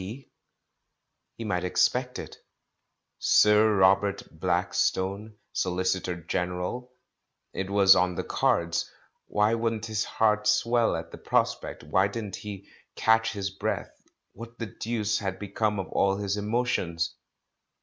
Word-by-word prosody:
P."? 115 +9 -9 1.1
He 115 - -5
might 90 -5 -1
expect 125 +7 +1
it. - - -8 0.8
"Sir 105 0 +5
Rob 95 +1 +5
ert 100 -1 -2 0.2
Blackstone, 95 +3 0 0.2
SoHcitor 90 -1 -1
General"? 90 +9 -3 0.6
It 95 0 -3
was 100 -1 +6
on 90 0 +1
the - - -2
cards. 85 0 0 0.4
Why 105 +2 +2
wouldn't 115 -1 -1
his 110 -1 -1
heart 105 -1 +1
swell 115 +1 +3
at 80 0 -6
the - - -10
prospect, - - -1
why 95 +6 +2
didn't 100 -2 -5
he 100 -2 -8 0.3
catch 115 0 +3
his 100 -2 -3
breath, 95 - -3 0.4
what 115 +2 -11
the 115 - -4
deuce 110 -1 -2
had 95 -2 -3
become 105 +1 -1
of 95 - -3
all 100 0 +1
his 100 -1 -1
emotions? 105 -7 -1
100 Hz, 130 wpm, -27 LUFS, 95-110 Hz, 1.1 s, was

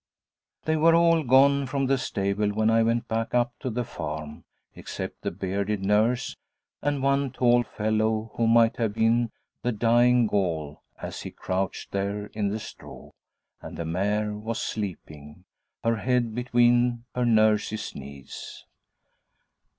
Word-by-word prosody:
They 160 0 +1
were 165 +2 +5
all 165 -1 +4
gone 140 +1 +4
from 135 +1 -1
the 135 0 +1
stable 100 -2 -1
when 110 +2 +1
I 115 0 +4
went 115 +1 +1
back 115 +2 -2
up 120 0 +2
to 130 - -3
the 125 +1 -2
farm, 75 -7 -6 0.3
except - - -7
the - - -2
bearded 100 +2 -2
nurse 110 +5 +1 0.5
and 145 -2 -1
one 140 0 +2
tall 120 -1 +3
fellow, 110 0 -1
who 115 - +1
might 115 0 +4
have 110 -3 -1
been 115 +1 +2 0.3
the 125 - 0
'Dying 120 +2 +4
Gaul' 85 -8 -2 0.2
as - - -6
he - - -6
crouched 95 +1 -3
there 100 +1 -3
in 105 -2 -1
the 105 - -2
straw; - - -11 0.5
and - - -9
the 85 - -4
mare 105 +5 -1
was 110 +2 -4
sleeping 80 -6 -6 0.4
her 115 0 +1
head 120 0 0
between 120 0 +2
her 125 -1 -1
nurse's 110 -2 +2
knees. 70 -1 -10
115 Hz, 145 wpm, -26 LUFS, 100-125 Hz, 0.5 s, were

